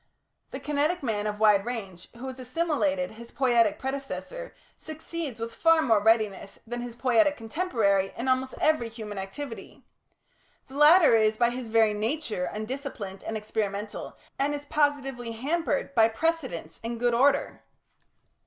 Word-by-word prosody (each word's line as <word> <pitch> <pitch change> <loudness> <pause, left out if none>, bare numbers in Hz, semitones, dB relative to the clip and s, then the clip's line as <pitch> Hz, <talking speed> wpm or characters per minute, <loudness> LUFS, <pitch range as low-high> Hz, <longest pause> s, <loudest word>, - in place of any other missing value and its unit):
The - - -6
kinetic 300 +3 0
man 215 -4 -1
of 210 0 -4
wide 210 -2 +5
range, 200 -7 -6
who 240 +3 -8
has 260 0 -6
assimilated 285 0 0
his 230 +2 -11
poietic 235 -6 +2
predecessor, 280 - -5 0.2
succeeds 315 -4 -6
with 230 0 -5
far 330 +2 +4
more 225 -6 +3
readiness 210 -3 +1
than 240 +1 -4
his 240 -1 -7
poietic 265 +4 +3
contemporary 225 - 0
in 235 +3 -3
almost 260 0 +1
every 310 -7 +2
human 215 -3 -7
activity. 225 +6 -7 0.9
The 265 - -11
latter 305 +1 +7
is 215 -1 +3
by 235 0 +3
his 250 -1 -5
very 220 -1 +3
nature 220 - -2
undisciplined 215 -4 -6
and 220 - -3
experimental, 210 -1 -4 0.2
and 285 +2 +1
is 290 0 -7
positively 275 -6 0
hampered 285 +3 -1
by 225 -3 +5
precedents 255 - -2
and 230 0 -4
good 240 0 +2
order. 275 +4 +2
240 Hz, 145 wpm, -27 LUFS, 220-285 Hz, 0.9 s, latter